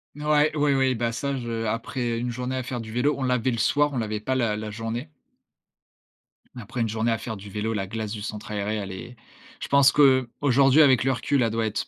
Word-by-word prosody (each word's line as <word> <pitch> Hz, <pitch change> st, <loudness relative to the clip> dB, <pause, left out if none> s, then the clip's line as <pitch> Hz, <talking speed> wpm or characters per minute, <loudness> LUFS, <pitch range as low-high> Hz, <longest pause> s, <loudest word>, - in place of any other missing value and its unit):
N 150 Hz, -, -10 dB
ouais, 150 Hz, 0 st, +3 dB
ouais, 145 Hz, -1 st, +3 dB
ouais, 130 Hz, -1 st, +2 dB
bah 115 Hz, 0 st, -1 dB
ça, 140 Hz, +4 st, -3 dB
je 115 Hz, -2 st, -4 dB
après 115 Hz, +1 st, -2 dB
une 120 Hz, +1 st, -2 dB
journée 125 Hz, +2 st, -4 dB
à 130 Hz, -, -1 dB
faire 125 Hz, -1 st, -4 dB
du 110 Hz, -1 st, -9 dB
vélo, 130 Hz, +6 st, +1 dB
on -, -, -6 dB
l'avait 125 Hz, -1 st, +1 dB
le 115 Hz, -, -2 dB
soir, 145 Hz, +5 st, +2 dB
on -, -, -2 dB
l'avait 105 Hz, -1 st, -2 dB
pas 130 Hz, +5 st, -2 dB
la 115 Hz, -4 st, +1 dB
la 105 Hz, 0 st, -5 dB
journée. 115 Hz, +7 st, -5 dB, 1.5 s
Après 115 Hz, +2 st, -5 dB
une 115 Hz, -, 0 dB
journée 115 Hz, +2 st, 0 dB
à 115 Hz, -, +1 dB
faire 110 Hz, -2 st, -6 dB
du 100 Hz, +1 st, -10 dB
vélo, 110 Hz, +3 st, -3 dB
la 95 Hz, -2 st, -2 dB
glace 110 Hz, 0 st, -4 dB
du 105 Hz, -2 st, -5 dB
centre 105 Hz, 0 st, -6 dB
aéré, 105 Hz, +1 st, -2 dB
elle 100 Hz, -2 st, -5 dB
est 120 Hz, +6 st, -9 dB, 0.5 s
je -, -, -4 dB
pense 140 Hz, -1 st, +5 dB
qu'aujourd'hui, 135 Hz, +1 st, +4 dB
avec 130 Hz, -4 st, +5 dB
le 135 Hz, -, +2 dB
recul, 130 Hz, +2 st, 0 dB
elle 115 Hz, -, +1 dB
doit 115 Hz, 0 st, -1 dB
être, 105 Hz, -1 st, -3 dB
120 Hz, 240 wpm, -25 LUFS, 110-135 Hz, 1.5 s, pense